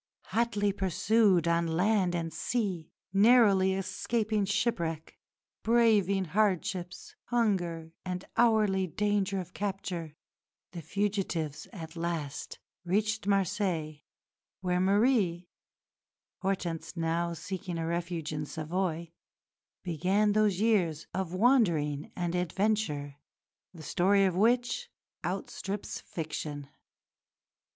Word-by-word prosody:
Hotly 210 Hz, -4 st, +1 dB
pursued 195 Hz, -1 st, +2 dB
on 170 Hz, 0 st, +2 dB
land 180 Hz, +2 st, +2 dB
and 165 Hz, -2 st, -3 dB
sea, 185 Hz, -2 st, -2 dB, 0.2 s
narrowly 200 Hz, -3 st, +5 dB
escaping 215 Hz, +2 st, -1 dB
shipwreck, 170 Hz, -7 st, -1 dB, 0.5 s
braving 215 Hz, -5 st, +3 dB
hardships, 185 Hz, -1 st, -1 dB
hunger, 175 Hz, -9 st, 0 dB
and 180 Hz, 0 st, -4 dB
hourly 210 Hz, -5 st, +3 dB
danger 205 Hz, +1 st, 0 dB
of 180 Hz, -1 st, -7 dB
capture, 185 Hz, -6 st, -4 dB, 0.6 s
the 170 Hz, -, -7 dB
fugitives 190 Hz, -6 st, -2 dB
at 165 Hz, -6 st, -9 dB
last 165 Hz, -4 st, -4 dB, 0.3 s
reached 210 Hz, +3 st, 0 dB
Marseilles 180 Hz, -6 st, 0 dB, 0.6 s
where 180 Hz, -1 st, 0 dB
Marie 195 Hz, -3 st, +2 dB, 0.9 s
(Hortense 185 Hz, -3 st, -3 dB
now 170 Hz, +1 st, 0 dB
seeking 175 Hz, +1 st, -5 dB
a 165 Hz, -, -2 dB
refuge 170 Hz, -1 st, -3 dB
in 150 Hz, -1 st, -3 dB
Savoy) 165 Hz, +1 st, -3 dB, 0.7 s
began 185 Hz, +5 st, +1 dB
those 210 Hz, -3 st, +2 dB
years 180 Hz, -8 st, +2 dB
of 185 Hz, -2 st, -2 dB
wandering 170 Hz, -, +2 dB
and 175 Hz, -1 st, -2 dB
adventure, 180 Hz, -5 st, -1 dB, 0.5 s
the 165 Hz, -3 st, -12 dB
story 195 Hz, +5 st, +3 dB
of 185 Hz, -2 st, +1 dB
which 240 Hz, -, +2 dB, 0.3 s
outstrips 200 Hz, +1 st, -4 dB
fiction. 150 Hz, -3 st, -5 dB
185 Hz, 95 wpm, -30 LUFS, 165-205 Hz, 0.9 s, narrowly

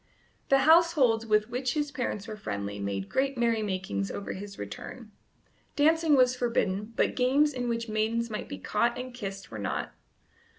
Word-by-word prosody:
The 275 Hz, -, +6 dB
households 295 Hz, -8 st, +4 dB
with 215 Hz, +1 st, +2 dB
which 250 Hz, +2 st, -1 dB
his 295 Hz, -1 st, -1 dB
parents 235 Hz, -6 st, -3 dB
were 215 Hz, -, -5 dB
friendly 100 Hz, -, -5 dB
made 100 Hz, -1 st, -3 dB
great 270 Hz, 0 st, 0 dB
merrymakings 195 Hz, -, -1 dB
over 200 Hz, -, -5 dB
his 200 Hz, +1 st, -8 dB
return. 215 Hz, -, -8 dB, 0.6 s
Dancing 315 Hz, +1 st, +4 dB
was 255 Hz, -1 st, +4 dB
forbidden, 215 Hz, -4 st, -1 dB
but -, -, +1 dB
games 280 Hz, +4 st, +3 dB
in 245 Hz, -2 st, -2 dB
which 230 Hz, 0 st, -2 dB
maidens 220 Hz, +2 st, 0 dB
might 215 Hz, -2 st, -5 dB
be 95 Hz, -, -5 dB
caught 235 Hz, -, 0 dB
and 255 Hz, 0 st, -6 dB
kissed 195 Hz, -, -7 dB
were 110 Hz, -, -6 dB
not. 100 Hz, -, -3 dB
230 Hz, 165 wpm, -28 LUFS, 200-255 Hz, 0.6 s, The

